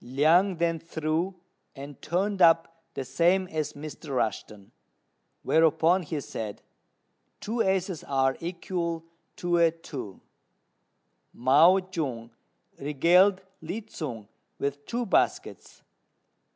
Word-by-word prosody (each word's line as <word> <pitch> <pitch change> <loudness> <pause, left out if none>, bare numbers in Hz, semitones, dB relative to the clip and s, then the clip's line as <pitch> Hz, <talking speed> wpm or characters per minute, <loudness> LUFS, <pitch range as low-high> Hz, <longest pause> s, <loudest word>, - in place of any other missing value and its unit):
Liang 160 +9 +3
then 165 -1 0
threw, 165 +3 -2 0.4
and 140 0 -10
turned 190 +4 -1
up 165 -1 +4
the 135 - -4
same 175 +8 +2
as 155 -1 -3
Mr. 150 +1 -9
Rushten; 105 -3 -3 0.7
whereupon 160 +3 +3
he 155 -2 -4
said: 110 -6 -6 0.8
"Two 230 +2 -2
aces 190 -3 0
are 135 -1 +1
equal 170 -1 -4 0.3
to 175 -1 0
a 170 -1 +5
two: 145 - -8 1.2
Mao 165 +10 +5
jung 125 -9 -4 0.5
regaled 175 +7 +3 0.2
Lin 195 +7 -6
tsung 120 - -6 0.3
with 140 +1 -4
two 240 +1 -2
baskets. - - -1
165 Hz, 105 wpm, -27 LUFS, 140-180 Hz, 1.2 s, a